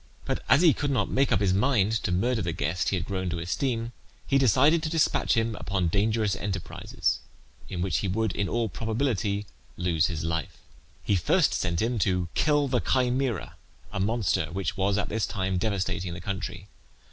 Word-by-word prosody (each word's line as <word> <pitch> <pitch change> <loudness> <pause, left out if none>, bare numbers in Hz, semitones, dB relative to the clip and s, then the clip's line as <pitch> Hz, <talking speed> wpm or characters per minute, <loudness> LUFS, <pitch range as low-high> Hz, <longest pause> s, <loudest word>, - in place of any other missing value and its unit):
But - - -2
as 155 - +6
he 165 -4 +7
could 145 - -2
not 115 -8 0
make 135 +1 +2
up - - +3
his 95 -2 +3
mind 110 -1 +2
to - - -2
murder 115 +6 +1
the 85 -3 -2
guest 85 +4 -1
he - - 0
had 90 -1 -2
grown 95 -2 -2
to 85 - -2
esteem, 115 +7 -2 0.3
he 135 - +3
decided 140 +6 +4
to 160 - -2
despatch 160 -4 +2
him 115 -1 +1
upon 95 -4 -1
dangerous 105 +1 +1
enterprises, 95 -1 -2 0.5
in 90 -1 -3
which 90 -3 0
he 100 - -2
would 110 +3 0
in 100 -1 -2
all 115 -1 0
probability 110 -2 -1 0.3
lose 85 -3 +2
his 80 -3 -4
life. 85 -1 -3 0.5
He 100 - +2
first 130 - +2
sent 85 +1 0
him 120 0 0
to 90 -2 +1
kill 145 -2 +2
the 125 -2 +1
Chimaera, 125 -4 0 0.3
a - - -4
monster 100 -5 +1
which 95 +2 -2
was 100 +1 +1
at 100 - -1
this 110 0 -1
time 95 -1 -1
devastating 95 -3 -1
the - - -7
country. 95 -1 -5
100 Hz, 190 wpm, -27 LUFS, 90-120 Hz, 0.5 s, he